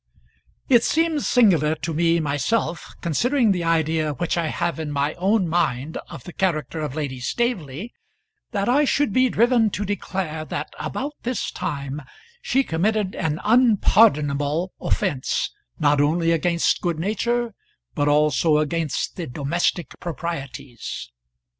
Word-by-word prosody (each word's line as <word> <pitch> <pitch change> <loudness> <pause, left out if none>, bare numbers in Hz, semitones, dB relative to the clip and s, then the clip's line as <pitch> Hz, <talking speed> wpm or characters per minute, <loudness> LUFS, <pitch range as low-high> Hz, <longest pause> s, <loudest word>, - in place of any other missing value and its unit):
It 240 -3 +5
seems 320 -2 +1
singular 170 - +4
to 160 +1 -4
me 165 +1 +2
myself, 155 +4 -1
considering 235 - +2
the 180 -3 0
idea 160 -2 +1
which 175 +2 -1
I 170 -2 0
have 170 +1 -2
in 155 -2 -3
my 145 +1 0
own 190 +1 +1
mind 160 -4 0
of - - -9
the 175 - -10
character 160 -4 -1
of 150 -3 -4
Lady 140 -4 -3
Staveley, 185 - -2 0.6
that 200 -1 -1
I 270 +5 +4
should 285 -5 +1
be 255 +1 +4
driven 235 0 +3
to 205 +1 -3
declare 185 -5 -3
that 150 - -5
about 285 +3 -4
this 250 +1 -2
time 140 0 -4 0.4
she 270 +2 +2
committed 200 +2 0
an 160 -2 -2
unpardonable 185 - +3
offence, 130 -2 -1 0.3
not 145 -1 +3
only 165 +3 +2
against 170 +1 +1
good 170 -3 -1
nature, 230 +6 -1 0.4
but 145 - 0
also 150 +1 +3
against 155 0 -1
the 170 -3 -4
domestic 155 +6 -1
proprieties. 140 - -6
170 Hz, 135 wpm, -23 LUFS, 150-210 Hz, 0.6 s, It